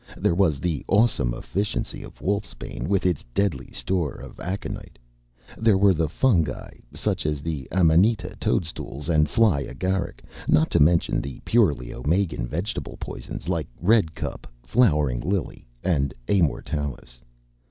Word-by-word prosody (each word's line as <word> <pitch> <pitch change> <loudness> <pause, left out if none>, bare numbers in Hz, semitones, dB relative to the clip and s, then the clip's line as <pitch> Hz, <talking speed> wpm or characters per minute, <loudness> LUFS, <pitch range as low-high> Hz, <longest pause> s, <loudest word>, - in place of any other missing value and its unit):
There - - +2
was 85 -6 +2
the 80 -2 -1
awesome 100 - +3
efficiency 100 +2 -3
of - - -11
wolfsbane 100 +2 -3
with 100 -1 +1
its 90 -5 +1
deadly 80 -11 0
store 90 -6 -1
of - - -11
aconite. 95 +3 -5 0.6
There 110 -3 +4
were 100 0 +5
the 80 -2 0
fungi 85 - +1 0.2
such - - -2
as 75 -1 -1
the 75 -4 -4
amanita 95 +5 +3
toadstools 75 -3 -2
and 75 -2 +3
fly 110 -10 +4
agaric, 95 +6 -2 0.2
not 80 +1 +3
to - - +3
mention 80 +3 +3
the 70 -2 -7
purely 75 - +2
Omegan 80 -1 0
vegetable 85 - -4
poisons - - -7
like 85 -5 -1
redcup, 100 -3 +1 0.2
flowering 75 - +3
lily, 95 -2 -3 0.2
and 70 -8 +1
amortalis. 75 -8 -1
85 Hz, 130 wpm, -25 LUFS, 75-100 Hz, 0.6 s, were